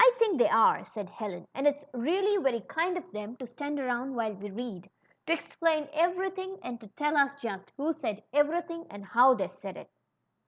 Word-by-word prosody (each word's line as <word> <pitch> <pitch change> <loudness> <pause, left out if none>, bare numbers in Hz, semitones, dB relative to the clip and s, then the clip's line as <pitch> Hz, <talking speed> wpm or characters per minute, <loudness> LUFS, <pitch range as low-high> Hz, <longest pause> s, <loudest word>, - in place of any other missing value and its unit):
think 430 - +3
they - - +6
are," 225 - +5
said 205 -4 -7
Helen. 190 -6 -6
^^And 275 +2 +1
it's 290 0 +1
really 380 - +2
very 245 -6 +1
kind 340 - -1
of 360 +1 -8
them 210 +2 -6
to 255 - -6
stand 285 +4 -4
around 255 0 -1
while 225 -2 -1
we 205 +1 -7
read, 200 -3 -6 0.4
to - - 0
explain 320 -2 0
everything 375 +3 0
and 240 -1 -6
to 215 - -11
tell 295 +8 -1
us 280 -1 +4
just 195 -6 -5
who 305 +4 0
said 220 -9 -4
every 295 +4 +3
thing 335 0 -8
and 200 -1 -9
how 250 +6 +6
they - - -1
said - - -9
it." - - -11
275 Hz, 200 wpm, -30 LUFS, 225-330 Hz, 0.4 s, they